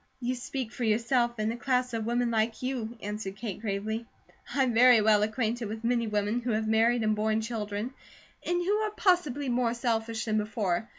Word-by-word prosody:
"You 250 0 -1
speak 255 -1 -4
for 255 -2 -5
yourself, 235 +2 +2
and 215 +1 0
a - - -5
class 250 0 0
of 225 -1 -2
women 240 0 +1
like 225 +1 0
you," 240 -3 -3
answered 205 -1 -4
Kate 210 -2 -6
gravely. 220 +2 -3 0.4
"I'm 265 -3 +1
very 245 0 +7
well 210 -1 +4
acquainted 225 +2 -1
with 220 +2 -6
many 235 -1 +1
women 210 +2 0
who 245 - -3
have 220 0 0
married 225 +2 +3
and 215 0 +2
borne 215 +1 +1
children, 220 +1 -4 0.5
and 350 0 0
who 410 +3 +2
are 430 0 0
possibly 350 -9 +1
more 240 -1 +1
selfish 230 -2 -1
than 215 -1 +1
before. 210 -2 -1
230 Hz, 190 wpm, -29 LUFS, 215-245 Hz, 0.5 s, very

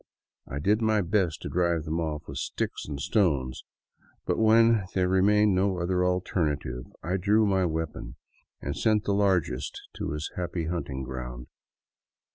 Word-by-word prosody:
I 70 - -5
did 105 +9 +2
my 110 -1 +3
best 90 -2 0
to - - -3
drive 85 -2 +1
them 80 +1 -2
off 75 -2 -3
with 70 - -5
sticks - - -3
and 70 -2 -5
stones, 70 - +1 0.6
but - - 0
when 110 -1 +5
there 90 -1 +2
remained 100 +2 +4
no 95 0 +1
other 90 +1 0
alternative 75 -8 -1 0.2
I 90 +3 0
drew 105 +4 +3
my 95 -2 +2
weapon 80 -2 -4 0.4
and - - -4
sent 110 -1 +2
the 100 - 0
largest 90 -10 +1 0.2
to - - -3
his 75 +1 -4
happy 85 -2 -3
hunting 80 -6 -3
grounds. 60 -1 -7
90 Hz, 155 wpm, -27 LUFS, 75-100 Hz, 0.6 s, when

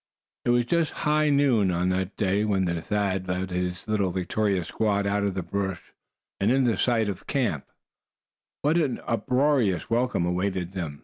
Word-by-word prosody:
It - - +1
was 120 0 +3
just 165 +3 +1
high 150 0 +3
noon 135 -9 +3
on 90 +1 0
that 95 +1 -2
day 100 +1 +1
when 100 -3 +1
Thad 95 +2 -1
led 90 +1 -2
his 90 0 -3
little 105 -3 +1
victorious 95 +1 -1
squad 100 -2 0
out 100 0 0
of 100 -2 -1
the 95 - -2
brush, 95 0 -4 0.5
and 100 - +2
in 125 -4 +3
sight 115 0 +1
of 100 -3 -3
the - - -22
camp. 115 - -1 1.0
What 150 +4 +3
an 145 -6 0
uproarious 125 - +1
welcome 120 -6 +1
awaited 90 0 -1
them! 80 -7 -5
100 Hz, 170 wpm, -26 LUFS, 90-120 Hz, 1.0 s, was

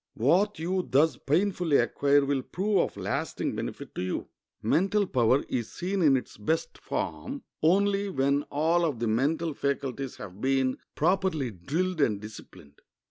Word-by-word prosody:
What 185 - +2
you 180 +3 -1
thus 150 +5 +4
painfully 170 0 +1
acquire 140 0 +3
will 140 -1 0
prove 195 +8 0
of - - -1
lasting - - -2
benefit - - -6
to - - -4
you. 90 0 -3 0.3
Mental 190 - +2
power 130 -4 +2
is 120 -3 -3
seen 190 +2 -2
in 140 -5 +5
its 125 - -7
best 160 +11 -2
form 75 -1 -4 0.2
only 200 +4 +3
when 140 -4 +1
all 165 +4 +2
of 155 -7 0
the 115 +1 -1
mental 150 +8 +1
faculties 135 -2 -2
have 100 0 -10
been 130 -1 +1 0.2
properly 170 -6 +1
drilled 160 - -2
and 105 -7 +2
disciplined. 105 -9 -12
145 Hz, 150 wpm, -28 LUFS, 130-180 Hz, 0.3 s, in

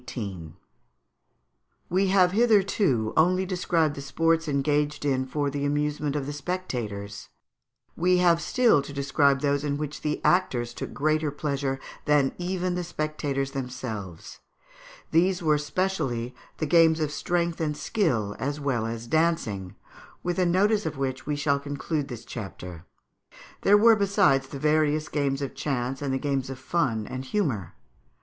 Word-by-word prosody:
] 80 - -12
We 190 +3 +2
have 185 -2 +4
hitherto 200 - +2
only 185 +4 +3
described 175 -4 +1
the 140 - -7
sports 165 +4 +1
engaged 145 +1 0
in 130 -2 +1
for 145 +1 -1
the 140 0 -3
amusement 145 0 -1
of 145 -2 -2
the 145 - -4
spectators; 120 - -5 0.7
we 180 +2 +3
have 170 -2 +4
still 235 - +3
to 140 - -9
describe 140 0 +2
those 145 -1 +1
in 145 -1 -1
which 150 0 -5
the 150 0 -1
actors 125 -10 +2
took - - -6
greater 155 +1 +1
pleasure 140 -2 -2 0.3
than 145 -3 +3
even 180 0 -1
the 180 0 -2
spectators 150 -4 -2
themselves. 115 - -6 0.7
These 180 +2 +2
were 155 -2 +3
specially 150 -7 -2 0.2
the 155 - -1
games 160 +1 +5
of 155 -2 -1
strength 170 +1 -1
and 150 -2 -1
skill 120 - 0
as 145 +2 -2
well 125 -6 -1
as 115 0 -5
dancing, 125 - 0 0.5
with 175 +1 -1
a 180 - +3
notice 200 +3 +2
of 155 -3 -5
which 130 0 -3
we 150 - 0
shall 140 -1 +1
conclude 145 +1 -3
this 120 -5 -8
chapter. 90 -6 -8 0.8
There 205 +1 +6
were, 225 +2 +6
besides, 195 -10 +3
the 140 - -7
various 155 +1 +1
games 140 -2 -1
of 135 - -4
chance 135 -1 -2
and 140 -2 -1
the 130 - +1
games 135 -1 -2
of 135 - -6
fun 130 -6 -1
and 130 +3 -5
humour. 130 - -2
145 Hz, 155 wpm, -26 LUFS, 130-170 Hz, 0.8 s, There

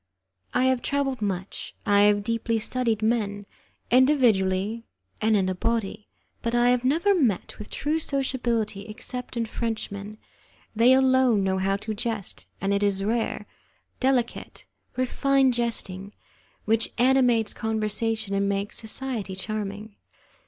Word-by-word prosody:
I 250 - +1
have 260 -1 +2
travelled 275 -3 -1
much, 190 -2 -4
I 205 0 +4
have 205 0 +1
deeply 230 +1 -1
studied 230 -1 -1
men, 205 -3 0 0.5
individually 230 -6 +3 0.4
and 220 0 +3
in 190 -2 +1
a 185 - 0
body, 220 +1 -2 0.3
but 235 0 -1
I 240 0 +4
have 250 0 +1
never 330 +10 +3
met 250 - 0
with 210 - -8
true 305 +3 -1
sociability 235 -8 -1
except 250 +3 -7
in 230 - 0
Frenchmen; 215 -2 -4 0.6
they 235 +4 +6
alone 260 -5 +4
know 190 0 0
how 195 +1 +1
to 215 +2 -5
jest, 215 -2 -4
and 195 +1 0
it 200 - +1
is 200 -1 +1
rare, 220 -1 -1 0.5
delicate, 255 -3 -1 0.3
refined 265 +1 +2
jesting, 205 -5 -3 0.5
which 225 +1 +1
animates 245 -3 +3
conversation 220 -1 -2
and 200 0 +1
makes 200 +1 -1
society 220 -4 -3
charming. 210 +1 -5
225 Hz, 130 wpm, -25 LUFS, 205-250 Hz, 0.6 s, they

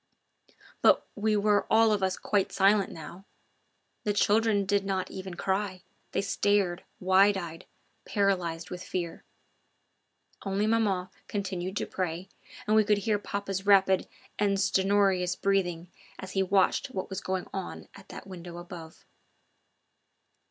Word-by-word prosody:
But - - +5
we 215 0 0
were 205 0 +2
all 225 0 +5
of 210 -2 +1
us 190 -1 0
quite 200 -2 0
silent 200 +1 +3
now. 170 +4 -10 0.8
The 205 - 0
children 205 0 +3
did 200 0 +1
not 190 -2 -2
even 190 -1 -7
cry; 190 0 -2 0.3
they - - 0
stared, 195 -3 +1 0.2
wide 190 +2 +4
eyed, 165 -3 -7 0.4
paralysed 180 -5 -1
with 180 0 -6
fear. 180 -4 -4 1.2
Only 195 +1 0
maman 210 -5 +1 0.2
continued 190 -2 -3
to - - -1
pray, 180 0 -4 0.4
and 215 - +2
we 220 - +6
could 210 0 +2
hear 210 0 0
papa's 200 -1 -4
rapid 190 -2 +5 0.3
and 200 -1 +2
stertorous 195 -2 +2
breathing 180 -4 -1 0.3
as 190 - -8
he 195 - +1
watched 190 +7 +2
what 195 -9 -5
was 190 - -4
going 185 -1 -2
on 190 -2 -6
at 195 - -15
that - - -9
window 175 -2 -9
above. 175 -2 -10
195 Hz, 140 wpm, -28 LUFS, 185-205 Hz, 1.2 s, we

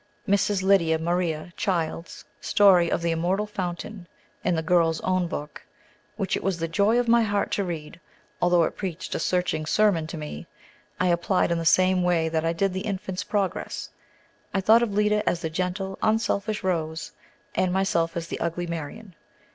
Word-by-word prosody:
Mrs. 200 -1 +2
Lydia 180 -5 +4
Maria 170 0 -2
Child's 170 -4 -2
story 185 -4 +5
of - - 0
"The 170 - +1
Immortal 180 +5 0
Fountain," 190 -1 -5 0.4
in 175 - +1
the 160 - -1
"Girl's 165 -1 +2
Own 185 -1 +1
Book," 150 -2 -6 0.6
which 195 -3 -1
it - - -4
was 195 -2 0
the 165 0 -2
joy 200 +8 +2
of 245 - 0
my 235 0 +5
heart 205 -2 0
to 200 - 0
read, 165 -3 -6 0.4
although 175 -1 +4
it - - -1
preached 185 -5 -5
a - - -1
searching 165 -3 0
sermon 190 -5 +2
to 165 - -6
me, 115 - -7 0.5
I 180 - +2
applied 175 +1 +1
in 170 - +1
the 165 - -4
same 185 +2 +4
way 170 -2 +2
that 160 0 -1
I 165 - +1
did 185 +3 0
the 185 - -2
"Infant's 190 -2 -3
Progress." 200 -3 -2 0.6
I - - +3
thought 220 +4 +5
of 235 -3 0
Lida 210 +1 +2
as 175 - -2
the 160 - -3
gentle, 185 +3 -3
unselfish 215 -1 0
Rose, 160 -4 -2 0.4
and 185 - +1
myself 170 -3 0
as 165 0 -4
the - - -5
ugly 170 +1 -2
Marion. 170 +5 -6
180 Hz, 180 wpm, -25 LUFS, 165-200 Hz, 0.6 s, story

